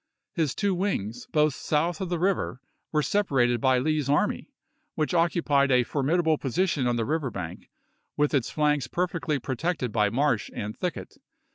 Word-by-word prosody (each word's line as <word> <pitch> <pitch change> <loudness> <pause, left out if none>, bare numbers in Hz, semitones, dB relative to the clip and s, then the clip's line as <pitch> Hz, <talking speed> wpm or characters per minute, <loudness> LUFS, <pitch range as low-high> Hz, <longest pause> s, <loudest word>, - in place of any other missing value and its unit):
His 155 -6 0
two 200 -2 +1
wings, 120 - -2
both 150 -1 +2
south 155 +5 -1
of 185 - -3
the 175 - 0
river, 185 -6 0 0.3
were 150 -1 +1
separated 130 - +1
by 130 -1 +4
Lee's 150 +1 0
army, 175 - +1 0.5
which 155 +1 -1
occupied 160 -5 +2
a 125 -1 +4
formidable 155 +5 +1
position 145 -1 0
on 120 - +1
the 115 -1 -1
river 150 -1 -1
bank, 90 -6 -7 0.5
with 150 +1 +2
its 130 -4 +1
flanks 150 -4 +1
perfectly 170 -3 -1
protected 135 0 -2
by 105 -2 +2
marsh 130 -1 +1
and 105 +1 -4
thicket. 180 -3 -5
150 Hz, 160 wpm, -26 LUFS, 125-170 Hz, 0.5 s, by